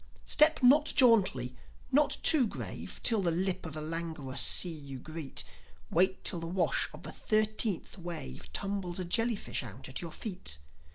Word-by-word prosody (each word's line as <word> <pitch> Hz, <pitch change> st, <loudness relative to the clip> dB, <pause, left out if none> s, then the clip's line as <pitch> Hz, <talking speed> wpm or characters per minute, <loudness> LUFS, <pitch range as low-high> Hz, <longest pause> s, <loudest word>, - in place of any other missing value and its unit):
Step 305 Hz, -2 st, +4 dB
not 290 Hz, +5 st, +6 dB
jauntily, 190 Hz, -, +4 dB, 0.4 s
not 290 Hz, +2 st, +2 dB
too 285 Hz, -7 st, +7 dB
grave, -, -, -6 dB
Till 225 Hz, -4 st, +4 dB
the 180 Hz, -, +1 dB
lip 180 Hz, +1 st, -2 dB
of 160 Hz, -, -8 dB
the 155 Hz, -, -5 dB
languorous 160 Hz, -4 st, -3 dB
sea 180 Hz, -, +3 dB
you 140 Hz, -4 st, -9 dB
greet; 155 Hz, +2 st, -5 dB, 0.5 s
Wait 190 Hz, +3 st, +1 dB
till 175 Hz, -, 0 dB
the 165 Hz, -, -6 dB
wash 180 Hz, +1 st, 0 dB
of -, -, -12 dB
the -, -, -6 dB
thirteenth 215 Hz, -3 st, 0 dB
wave 70 Hz, -, -7 dB
Tumbles 195 Hz, -, -2 dB
a 185 Hz, -, -3 dB
jellyfish 225 Hz, +4 st, 0 dB
out 120 Hz, -1 st, -8 dB
at 130 Hz, -, -4 dB
your 170 Hz, -2 st, -7 dB
feet. 180 Hz, -, -4 dB
175 Hz, 165 wpm, -30 LUFS, 155-215 Hz, 0.5 s, too